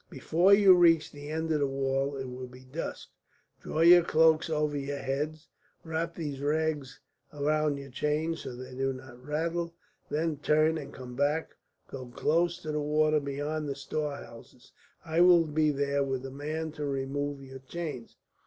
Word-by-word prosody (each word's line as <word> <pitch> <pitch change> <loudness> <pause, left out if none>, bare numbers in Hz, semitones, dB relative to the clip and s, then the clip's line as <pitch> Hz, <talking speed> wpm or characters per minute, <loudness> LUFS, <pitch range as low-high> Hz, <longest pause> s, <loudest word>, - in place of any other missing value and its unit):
Before 175 +5 +2
you 200 -2 +8
reach 165 -3 +4
the 145 0 -9
end 160 +1 -2
of 155 - +2
the 140 - +2
wall 135 +1 -1
it 135 - -4
will 125 0 -7
be 125 +1 -14
dusk. 145 +6 -6 0.5
Draw 155 - -3
your 175 +1 +8
cloaks 160 0 +4
over 150 -1 0
your 140 0 -3
heads, 150 +4 -3 0.4
wrap 165 +1 -3
these 145 -5 -5
rags 150 -2 -1 0.3
about 150 0 0
your 140 -1 -9
chains, 155 +5 -1
so 125 - -7
that 125 - -7
they - - -9
do 135 +1 0
not 130 -1 -12
rattle. 165 +3 -2 0.3
Then 155 0 -1
turn 155 +2 +2
and 145 - -8
come 125 -1 -9
back, 145 +4 0 0.4
go 130 -2 -8
close 170 +7 +1
to 155 - -3
the 150 0 -1
water 155 +1 +2
beyond 145 +2 -3
the 140 - -2
storehouses. 140 -4 -6 0.3
I 165 +1 +1
will 175 -2 +7
be 155 0 +1
there 140 0 0
with 135 -1 -3
a 135 - -6
man 155 +3 -4
to 150 -1 -4
remove 140 +1 -3
your 130 0 -10
chains. 140 -3 -6
150 Hz, 175 wpm, -29 LUFS, 135-160 Hz, 0.5 s, you